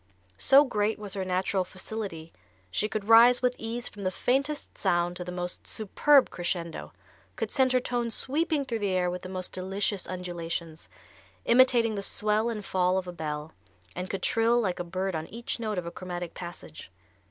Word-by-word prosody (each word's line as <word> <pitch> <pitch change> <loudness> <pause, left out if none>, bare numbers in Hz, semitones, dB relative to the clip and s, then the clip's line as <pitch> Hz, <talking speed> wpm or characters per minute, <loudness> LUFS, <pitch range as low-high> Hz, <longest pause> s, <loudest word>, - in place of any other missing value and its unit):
So 275 - +7
great 215 -4 0
was 205 -2 -5
her 195 - -1
natural 185 +1 0
facility 185 -3 -6 0.4
she 210 - 0
could 215 -2 -3
rise 235 +3 +7
with 250 0 +3
ease 235 +2 -3
from 205 - -9
the 185 - +1
faintest 275 +9 -1
sound 175 0 +1
to 180 - -3
the 180 - -6
most 180 0 -5
superb 270 +6 +3
crescendo, 175 -2 -3 0.4
could - - -3
send 260 -2 +3
her 255 - +4
tones 240 -2 -2
sweeping 300 +1 +1
through 230 -3 -2
the 205 -2 0
air 180 -1 +1
with 180 0 -5
the 185 - -8
most 185 -1 -5
delicious 195 +1 -2
undulations, 170 -3 -5 0.6
imitating 235 -2 +5
the 200 - -3
swell 210 +3 +1
and 210 -3 -4
fall 185 0 +1
of 185 -1 -2
a 180 - -5
bell, 155 -1 -5 0.4
and 180 +1 -4
could 195 -2 -4
trill 230 +1 +3
like 185 -6 -1
a - - -1
bird 185 +2 -3
on 160 0 -4
each 235 +1 -4
note 215 -3 -2
of 180 - -2
a 170 - -5
chromatic 175 -2 -6
passage. 130 - -9
195 Hz, 185 wpm, -28 LUFS, 180-230 Hz, 0.6 s, So